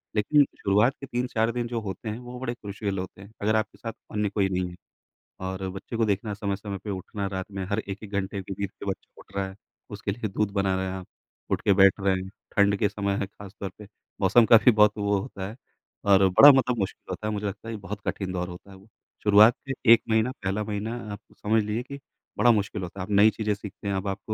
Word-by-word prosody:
लेकिन 145 +8 +5 0.2
शुरुआत 105 +6 +3
के 135 - -7
3-4 120 -3 0
दिन 120 0 -2
जो 120 -1 -2
होते 100 +2 -5
हैं 105 - -4
वो 125 0 -9
बड़े 125 -2 -2
क्रूशियल 100 -3 -4
होते 95 +1 -7
हैं, 100 +2 -13
अगर 110 +2 +2
आपके 110 -1 -1
साथ 115 -1 -6 0.2
अन्य 105 -1 0
कोई 100 -1 +1
नहीं 90 -1 -1
है। 90 - -11 0.7
और 95 0 -4
बच्चे 95 +5 -7
को 115 - +3
देखना 105 +1 -1
समय-समय 100 0 -3
पे 105 - -6
उठना 100 +1 -4
रात 95 +1 -5
में 95 -1 -4
हर 105 +1 0
1-1 100 0 -7
घंटे 100 0 -2
के 95 +1 -6
बीच 100 0 -3
के - - -11
बच्चा 95 -1 -5
उठ 100 - -19
रहा 100 -1 -1
है, 95 - -10 0.3
उसके 105 0 -4
लिए 110 +1 -3
दूध 100 +1 -1
बना 100 -1 +1
रहे 95 0 -1
हैं 95 - -3
आप। 95 -1 -7 0.4
उठ - - +1
के 100 - +4
बैठ 95 0 +7
रहे 100 -1 +2
हैं, 95 - -7 0.3
ठंड 100 0 +5
के 105 - +2
समय 100 -1 -1
है 100 - -1
ख़ास-तौर 100 0 -8
पे 105 - -11 0.4
मौसम 120 -2 +6
का 115 - +8
भी 125 - +9
बहुत 105 -1 +5
वो 100 -1 +1
होता 95 -3 -6
है, 110 - -9 0.5
और 100 -1 +6
बड़ा 140 +10 +10
मतलब 125 -2 +2
मुश्किल 95 - -3
होता 105 - -4
है, 105 - -1
मुझे 105 0 -3
लगता 100 +3 -7
है 115 - -4
ये 110 - -6
बहुत 100 +2 -6
कठिन 95 -1 -2
दौर 90 -1 -2
होता 90 +3 -11
है 95 - -12
वो। 95 +2 -19 0.4
शुरुआत 105 +3 +7
के 135 - -1 0.2
1 115 - +5
महीना, 110 +3 +2
पहला 95 +3 -1
महीना 105 +2 -3 0.2
आप 100 - -7 0.2
समझ 110 +2 +2
लीजिए 105 +3 -2
कि 140 +2 -9 0.4
बड़ा 120 - +6
मुश्किल 105 -2 0
होता 90 +2 -7
है। - - -2
आप 105 - -9
नई 105 +2 +8
चीज़ें 110 -1 -1
सीखते 105 0 -9
हैं, 100 - 0
अब 95 +1 -2
आप 95 +1 -2
100 Hz, 250 wpm, -26 LUFS, 95-110 Hz, 0.7 s, बड़ा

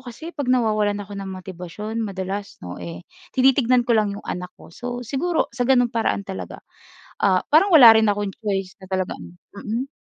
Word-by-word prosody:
kasi 315 +8 -8
'pag 285 -4 -3
nawawalan 215 -4 +2
ako 205 0 -11
ng 195 -1 -6
motibasyon 185 +3 -7
madalas, 195 0 -5
'no 90 0 -7
eh, 85 0 -7 0.3
tinitignan 255 -1 +4
ko 240 - +2
lang 205 -2 +1
'yong 205 - -11
anak 180 0 -5
ko. - - -15
So, 245 0 -5
siguro 290 +8 -1
sa 245 - -1
ganung 245 -3 +4
paraan 225 -3 0
talaga, 190 -1 -7 0.6
ah, 185 -2 +3
parang 325 +7 +5
wala 235 -6 +10
rin 220 0 +4
akong 205 -1 -1
choice 195 -3 -2
na 190 - -11
talagang 95 - -4 0.2
mm. 225 +6 -4
210 Hz, 180 wpm, -22 LUFS, 190-245 Hz, 0.6 s, wala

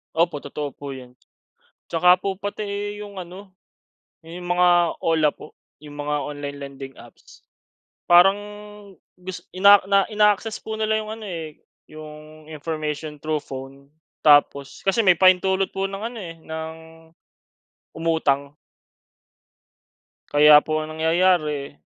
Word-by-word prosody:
Opo, 170 -2 +1
totoo 145 +1 -6
po 140 0 -8
'yun. 125 -1 -13 0.7
Tsaka 180 +2 +4
po 195 -1 -3
pati, 205 +1 -5
eh, 205 +1 -5
'yung 205 -1 -10
ano, 185 +2 -9 0.7
'yan 165 0 -11
'yung - - -7
mga 180 0 +4 0.3
OLA 160 -2 +2
po, - - -15 0.2
'yung 145 -1 -12
mga 150 0 -3
online 145 -1 -6
lending 135 -1 -9
apps. 120 - -17 0.7
Parang 190 +3 +6 0.8
gus 180 0 -9
ina 200 +2 +7
na 195 +2 +2
ina-access 210 +1 +1
po 220 - -7
nila 220 0 0
'yung 215 0 -5
ano, 220 -1 -9
eh, 160 -4 -7 0.2
'yung 155 0 -13
information 155 -1 -5
through 155 -1 -1
phone 135 +2 -10 0.3
tapos 145 -2 +3
kasi 195 +4 +1
may 185 - +7
pahintulot 190 +1 +3
po 195 - -2
ng 195 +1 -7
ano, 235 +1 -5
eh, 170 -4 -8
ng 160 0 -6 1.2
umutang. 145 -4 0 1.8
Kaya 150 0 +8
po 155 0 -1
ang 155 0 -7
nangyayari 160 -4 +1
160 Hz, 130 wpm, -22 LUFS, 150-195 Hz, 1.8 s, Kaya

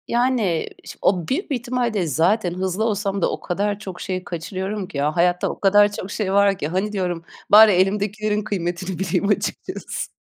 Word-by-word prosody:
Yani, 235 -9 +1 0.2
şi - - -9
o 180 -4 +1
büyük 305 +5 -2
bir - - +2
ihtimalle 245 -1 -1
de 190 -5 0
zaten 175 - +1
hızlı 185 +3 -2
olsam 200 -3 -1
da - - +2
o - - -4
kadar 205 +3 -2
çok 190 -4 -8
şeyi 185 -2 -3
kaçırıyorum 190 +4 -4
ki. 185 - -8
Ya, 150 +2 0
hayatta 175 +1 +2
o - - -6
kadar 205 +1 +5
çok 200 -2 -6
şey 195 -3 -2
var 200 -1 +4
ki. 150 - -3
"Hani," 190 +6 -1
diyorum 180 -4 -2 0.3
"bari 215 +1 +9
elimdekilerin 210 +3 +1
kıymetini 180 -2 -3
bileyim 190 +1 0
açıkçası." 205 - -3
195 Hz, 190 wpm, -22 LUFS, 180-210 Hz, 0.3 s, bari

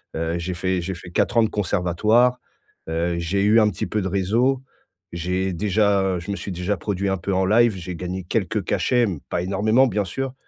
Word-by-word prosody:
Heu, 80 +1 -1
j'ai 90 +2 -3
fait 95 0 -1
j'ai 95 +3 -4
fait 90 0 -11
4 115 - 0
ans 115 - +6
de 110 - +1
conservatoire, 105 +6 +2 0.5
heu, 85 +1 -1
j'ai 90 +4 -1
eu 110 +2 +5
un 105 - +4
petit 100 - -4
peu 105 - -1
de 95 - -2
réseau, 115 +8 +1 0.5
j'ai 90 +2 -1
déjà 100 -1 +1
je 85 +4 -10
me - - -1
suis 100 - -6
déjà 90 +4 -1
produit 100 +1 -2
un 95 - 0
peu 95 +3 -3
en 95 0 +2
live, 115 +3 +4
j'ai 90 0 -6
gagné 90 +2 -5
quelques 105 +2 -1
cachets 120 -2 +2
mais 90 -7 -4
pas 85 - -1
énormément 110 +7 +3
bien 105 -3 0
sûr 135 +8 -4
95 Hz, 210 wpm, -22 LUFS, 90-110 Hz, 0.5 s, ans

